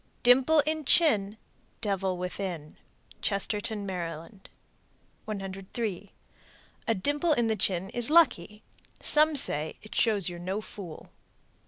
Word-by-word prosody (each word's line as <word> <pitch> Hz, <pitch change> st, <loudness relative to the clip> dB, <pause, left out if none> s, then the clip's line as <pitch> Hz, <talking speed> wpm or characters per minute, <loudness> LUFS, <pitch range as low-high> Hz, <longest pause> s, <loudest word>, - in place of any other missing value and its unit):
Dimple 265 Hz, +6 st, +5 dB
in 310 Hz, +1 st, -3 dB
chin. 220 Hz, -, +2 dB, 0.4 s
Devil 195 Hz, -3 st, -1 dB
within. 180 Hz, -4 st, -5 dB, 0.4 s
Chestertown, 205 Hz, +1 st, -2 dB
Md. 175 Hz, +1 st, -6 dB, 0.8 s
103. 195 Hz, 0 st, -5 dB, 0.8 s
A 225 Hz, -, +2 dB
dimple 290 Hz, -, +1 dB
in 240 Hz, -5 st, +1 dB
the 220 Hz, -1 st, +1 dB
chin 190 Hz, -1 st, -1 dB
is 240 Hz, +1 st, 0 dB
lucky. 220 Hz, -, +3 dB, 0.4 s
Some 305 Hz, +1 st, +5 dB
say 155 Hz, -, 0 dB
"it 215 Hz, -, -11 dB
shows 210 Hz, -6 st, +4 dB
you're 175 Hz, -1 st, -6 dB
no 185 Hz, +4 st, -3 dB
fool." 190 Hz, -6 st, -10 dB
205 Hz, 115 wpm, -28 LUFS, 185-240 Hz, 0.8 s, Dimple